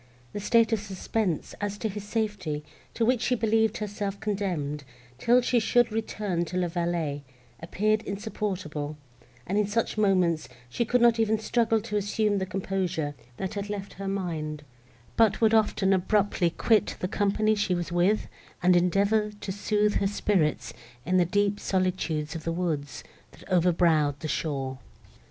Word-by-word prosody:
The - - -3
state 225 +2 +3
of 220 - +2
suspense, 195 -2 -2
as 205 0 -2
to 220 - -2
his 210 -1 -5
safety, 205 -9 -2 0.3
to 230 - +1
which 250 -1 +2
she 250 - +2
believed 220 0 +2
herself 205 -1 -4
condemned, 175 -9 -2 0.4
till 245 - +4
she 245 0 +2
should 240 +1 +3
return 210 -5 -2
to 180 - -4
La 180 -1 0
Vallée, 165 -4 -2 0.4
appeared 215 +6 +1
insupportable, 185 -8 -4 0.5
and, 200 +4 0
in 210 - +1
such 215 +1 -1
moments, 185 -7 +2 0.2
she 235 - -1
could 245 +2 +2
not 235 -1 +5
even 220 0 +2
struggle 225 0 +1
to 210 -1 -2
assume 205 0 +1
the 190 - -2
composure, 185 -6 -2 0.2
that 190 - -4
had 200 0 -4
left 200 -1 -5
her 195 - -3
mind, 160 -6 -3 0.5
but 220 -2 +4
would 225 -1 +4
often 210 -3 +3
abruptly 190 -1 +2
quit 215 +5 +2
the 180 - -1
company 210 +2 +1
she 205 -3 0
was 175 -1 -3
with, 180 +5 +2 0.4
and 180 0 +5
endeavour 200 +5 +2
to 190 - -4
sooth 210 +1 +1
her 195 - +1
spirits 195 -6 0 0.3
in 185 +2 +2
the 180 - +4
deep 205 +3 +1
solitudes 180 -5 -1
of 165 -2 -6
the 165 - -1
woods, 155 -6 -3 0.3
that - - -15
overbrowed 165 -5 +3
the 155 - -3
shore. 135 -4 -2
195 Hz, 160 wpm, -27 LUFS, 175-215 Hz, 0.5 s, not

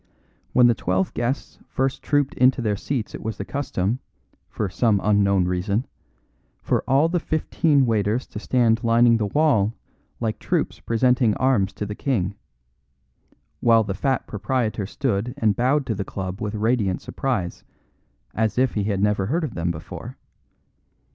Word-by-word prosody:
When 125 - +5
the 120 - +6
twelve 95 -2 -1
guests 120 +3 -3
first 135 0 -1
trooped 145 -2 +1
into 130 +1 +3
their 110 -4 0
seats 120 +2 -3
it - - -7
was 110 -1 -4
the 100 - -5
custom 120 -5 -2 0.5
(for 105 - -2
some 105 +2 +2
unknown 100 -3 +3
reason) 95 +6 -1 0.8
for - - 0
all 140 +5 +4
the 175 +1 0
fifteen 155 -3 +1
waiters 110 +1 0
to 105 - -6
stand 115 0 +2
lining 115 0 +5
the 105 -2 -1
wall 115 -6 +2 0.4
like 110 -2 -2
troops - - -1
presenting 120 -1 +2
arms 120 -7 +2
to 105 - -4
the 105 - -5
king, 105 -6 -1 1.3
while 115 -1 +4
the 100 - -3
fat 130 +6 -1
proprietor 110 -1 -2
stood 120 -1 -2
and 105 -2 +2
bowed 135 +4 +2
to 115 - -1
the 100 -1 -3
club 95 0 -6
with 105 0 -3
radiant 105 -3 +1
surprise, 115 -10 -3 0.7
as 110 0 0
if 130 0 +2
he 105 -2 -1
had 100 -2 0
never 105 -2 +1
heard 165 - 0
of 140 -8 -3
them 85 0 -2
before. 80 -2 -7
115 Hz, 160 wpm, -23 LUFS, 100-130 Hz, 1.3 s, the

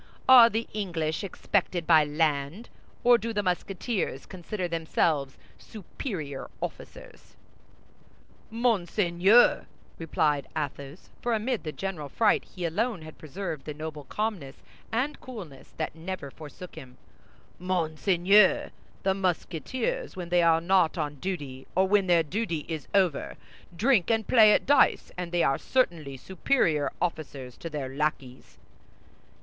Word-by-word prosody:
"Are 245 -3 +9
the 225 +1 -2
English 170 -5 -2
expected 185 -2 -1
by 160 -2 +6
land, 150 +6 -1 0.3
or 240 -1 +6
do 230 +2 -4
the 205 -1 -1
Musketeers 185 - -2
consider 185 +1 -5
themselves 160 -4 0 0.2
superior 170 - -7
officers?" - - -9 1.1
"Monseigneur," 210 -2 +3 0.3
replied 150 -3 0
Athos, 140 +1 -6
for 240 -1 0
amid 225 +2 -2
the 155 - -4
general 170 -5 -5
fright 215 - +2
he 180 -2 -6
alone 205 +2 -1
had 155 0 -12
preserved 160 -1 -6
the 150 - -6
noble 155 -1 -7
calmness 195 -8 -4 0.3
and 255 +6 -1
coolness 185 - -10
that 155 - -3
never 165 -3 -6
forsook 160 +5 -11
him, 125 -1 -12 0.6
"Monseigneur, 180 +3 +3 0.3
the 190 - +2
Musketeers, 195 - -2
when 175 -2 -6
they 175 0 +3
are 165 -1 +4
not 180 -1 +2
on 150 -2 -3
duty, 145 -8 -5
or 190 +1 +3
when 200 -1 +3
their 170 -2 +4
duty 170 -2 -3
is 160 -4 -5
over, 185 -7 +1 0.4
drink 220 -2 +3
and 225 -1 +1
play 220 -3 +7
at - - +3
dice, 285 - +3
and 180 -1 -5
they 175 -1 +2
are 135 - +2
certainly 165 - 0
superior 165 - 0
officers 145 -7 -4
to 165 - -7
their 135 -4 -5
lackeys." 140 -4 -3
175 Hz, 130 wpm, -27 LUFS, 155-205 Hz, 1.1 s, Are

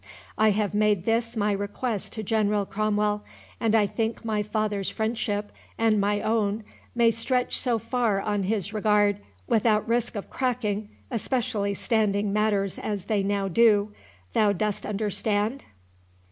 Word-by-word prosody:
I 215 0 +4
have 205 -1 0
made 210 -3 +2
this 230 0 0
my 210 0 +2
request 205 +2 -3
to 220 - -4
General 210 -1 +1
Cromwell, 210 0 0 0.4
and 225 -1 +2
I 215 -2 +5
think 225 +2 -3
my 215 -2 0
father's 210 -2 -1
friendship 220 -2 -2 0.3
and 220 -2 +3
my 205 +1 +1
own 215 -1 0 0.3
may 235 -1 +5
stretch 250 +3 0
so 245 -3 +1
far 230 -3 0
on 205 0 -1
his 200 -1 -1
regard 205 -1 +3 0.3
without 215 - +2
risk 235 0 0
of 205 - -6
cracking, 220 -5 -1 0.2
especially 225 -4 -1
standing 205 -2 +1
matters 205 -2 +1
as 205 -3 -3
they 210 -2 +1
now 200 0 0
do—thou 205 - +1
dost 210 +1 -2
understand?" 210 +3 -1
210 Hz, 140 wpm, -26 LUFS, 205-225 Hz, 0.4 s, I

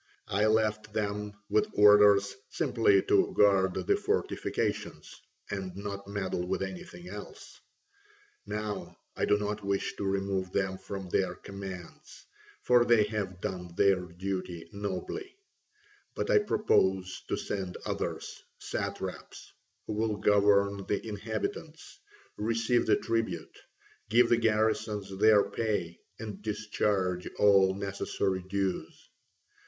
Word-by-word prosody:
I 105 +3 +2
left 110 -1 +1
them 105 -1 -2
with 105 +1 +2
orders 105 -1 +6
simply 115 -8 +3
to - - +3
guard 95 -2 +4
the - - +3
fortifications - - -2 0.3
and 95 -2 -4
not 100 0 -6
meddle 95 -3 -2
with 95 - -1
anything 90 -2 -8
else. 105 +2 -10 0.9
Now 105 -1 -4 0.2
I - - 0
do 105 - +3
not 105 0 -3
wish 100 0 -1
to - - -4
remove 95 -1 -1
them 95 -1 -1
from 95 -2 -6
their 90 0 0
commands, 95 -3 -9 0.4
for 125 -1 +5
they 120 -3 +5
have 95 -4 -3
done 90 -2 -5
their 100 -2 +4
duty 90 -1 -5
nobly, 100 - -5 0.8
but - - -1
I 450 - +6
propose 95 - +1
to - - -1
send 95 -3 -4
others, - - -4 0.2
satraps, - - -5 0.3
who - - -4
will 110 0 0
govern 100 -1 +3
the 105 - -1
inhabitants, 110 - -5 0.4
receive 115 +2 +1
the - - +5
tribute, 115 -1 -2 0.5
give 115 +2 +5
the 120 - +5
garrisons 110 -3 0
their 105 -1 +6
pay, 100 -7 -2 0.2
and 105 -3 -7
discharge 105 -3 -1
all 95 -2 +5
necessary 100 -1 -2
dues. 95 -1 -3
100 Hz, 120 wpm, -30 LUFS, 95-110 Hz, 0.9 s, orders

